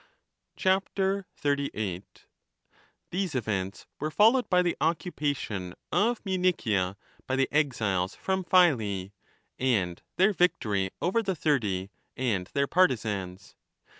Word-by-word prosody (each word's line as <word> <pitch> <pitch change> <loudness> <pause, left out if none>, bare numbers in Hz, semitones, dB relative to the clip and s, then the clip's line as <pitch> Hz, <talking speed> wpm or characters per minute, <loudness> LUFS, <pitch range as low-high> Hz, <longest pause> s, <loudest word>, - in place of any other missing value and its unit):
38 145 - -1 0.9
These 185 -3 -2
events 100 -5 -2
were 155 - -1
followed 225 +9 +4
by 180 -1 +4
the 175 - 0
occupation 145 - -2 0.2
of 215 +7 +1
Munichia 160 - +1 0.3
by 130 - 0
the 135 0 +2
exiles 105 -11 0
from 190 0 -1
Phyle, 110 - +3 0.5
and 100 -10 0 0.2
their 195 +3 +4
victory 105 - +1
over 190 +7 +2
the 190 -4 -2
Thirty 105 - 0 0.3
and 105 -8 0
their 140 0 +2
partisans. 105 - 0
140 Hz, 105 wpm, -28 LUFS, -, 0.9 s, followed